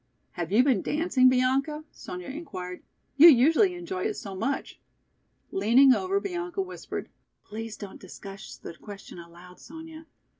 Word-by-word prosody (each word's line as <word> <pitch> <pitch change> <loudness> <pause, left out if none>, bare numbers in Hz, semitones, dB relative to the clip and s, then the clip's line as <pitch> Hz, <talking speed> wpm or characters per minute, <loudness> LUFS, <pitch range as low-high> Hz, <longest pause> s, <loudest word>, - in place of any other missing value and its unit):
"Have 175 -1 -5
you 225 +5 +5
been 255 -8 +2
dancing, 295 -5 +3
Bianca?" 270 +4 +1
Sonya 180 0 -8
inquired. 185 - -7 0.4
"You 315 +4 +10
usually 325 - +5
enjoy 370 +2 -4
it 425 -1 -1
so 200 - -7
much." 270 +9 -3 0.7
Leaning 240 +7 +5
over, 380 +7 0
Bianca 355 -1 -3
whispered. 370 - -7 0.4
"Please 220 +1 -7
don't 200 -2 -9
discuss 195 -7 -10
the 130 - -9
question 200 -1 -11
aloud, 175 +2 -14
Sonya. 320 0 -11
260 Hz, 140 wpm, -27 LUFS, 195-330 Hz, 0.7 s, You